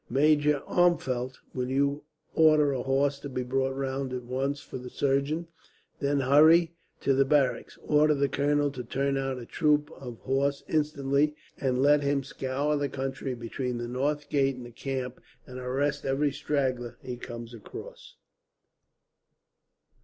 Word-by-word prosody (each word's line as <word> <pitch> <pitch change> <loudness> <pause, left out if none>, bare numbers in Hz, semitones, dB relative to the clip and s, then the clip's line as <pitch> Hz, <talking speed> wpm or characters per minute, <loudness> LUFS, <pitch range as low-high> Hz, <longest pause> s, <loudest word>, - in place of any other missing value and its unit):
"Major 145 +2 +3
Armfeldt, 130 -8 +1 0.2
will 125 -1 -2
you 140 +2 0 0.3
order 155 -3 +5
a 130 - -2
horse 140 +2 +1
to 140 - -7
be 125 -1 -3
brought 135 +1 0
round 135 -1 -3
at 125 -1 -4
once 135 +3 -2
for 130 - -8
the 125 0 -8
surgeon, 140 +6 0 0.5
then 140 0 +1
hurry 160 +5 +6 0.3
to 135 - +2
the 135 +1 +4
barracks. 135 -1 +1
Order 150 0 +4
the 140 0 +2
colonel 145 +1 +1
to 130 -3 -6
turn 135 +3 -1
out 135 -1 -1
a 120 - -7
troop 150 +1 +1
of 125 -4 -9
horse 140 +1 0
instantly, 150 -1 +1 0.2
and 130 -1 +1
let 145 +1 +5
him 140 -1 +1
scour 140 +1 -1
the 145 -1 -1
country 135 -1 -4
between 120 +1 -4
the 120 0 -4
north 145 +4 -1
gate 135 -2 +1
and 125 -1 -9
the 120 - -10
camp, 130 +1 -4 0.2
and 130 0 -8
arrest 135 +3 -1
every 140 +2 +1
straggler 135 -4 -2
he 125 - -5
comes 120 -1 -8
across." 115 - -10
135 Hz, 155 wpm, -28 LUFS, 130-145 Hz, 0.5 s, hurry